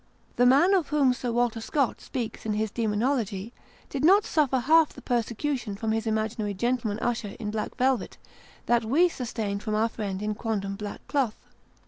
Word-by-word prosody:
The 245 +1 +4
man 285 +10 +5
of 365 -6 +2
whom 280 -4 +3
Sir 250 -1 -3
Walter 235 -1 0
Scott 275 +2 0
speaks 240 -4 -5
in 215 - -1
his 215 0 -1
Demonology, 220 -1 -1 0.3
did 275 0 -4
not 390 +6 +6
suffer 285 -5 +2
half 310 +5 +4
the - - -11
persecution 240 -1 -1
from 220 +2 -2
his 225 +1 -1
imaginary 215 -1 -1
gentleman 230 0 0
usher 225 -3 -2
in 210 -2 -3
black 215 0 -4
velvet, 255 -4 0 0.5
that 240 -1 +2
we 290 +11 +4
sustained 220 -8 -3
from 215 -1 -2
our 225 +2 +2
friend 200 -3 -4
in 210 0 -1
quondam 205 -3 -3
black 205 0 -7
cloth. 265 -7 0
230 Hz, 175 wpm, -27 LUFS, 215-260 Hz, 0.5 s, not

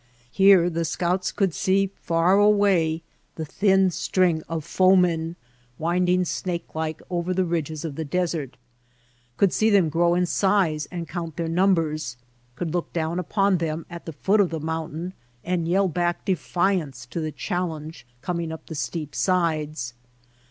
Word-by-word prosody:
Here 190 -1 +6
the 170 0 -1
scouts 180 +3 -1
could 195 -5 0
see 195 +2 +1
far 170 +4 +3
away 195 -6 +3 0.3
the 160 - -4
thin 190 +2 +3
string 175 -2 +1
of 165 -2 -3
foemen 180 -3 +3 0.4
winding 180 +2 +1
snake 175 0 -4
like 160 0 -3
over 175 +1 -1
the 185 0 +2
ridges 160 -2 -2
of 155 - -4
the 160 - -4
desert, 160 -3 -2 0.8
could 195 -3 +3
see 220 - +3
them 195 -6 +4
grow 170 +2 +2
in 180 0 +2
size 180 -6 +1
and 170 -2 -5
count 165 -3 -5
their 165 - -1
numbers, 165 -6 +1 0.4
could 165 +2 -3
look 175 -1 -2
down 165 +1 -1
upon 195 +1 +1
them 160 0 -3
at 170 0 -9
the 165 - -5
foot 195 +8 +2
of 190 - +2
the 165 - -3
mountain 160 +2 -4 0.3
and 175 -2 -1
yell 190 +3 +3
back 175 0 -1
defiance 175 -8 0
to 125 +7 -5
the 155 -1 -2
challenge 160 - -4 0.2
coming 170 0 -2
up 160 - -8
the - - -8
steep 150 +1 -4
sides. 155 -8 0
170 Hz, 160 wpm, -24 LUFS, 160-185 Hz, 0.8 s, Here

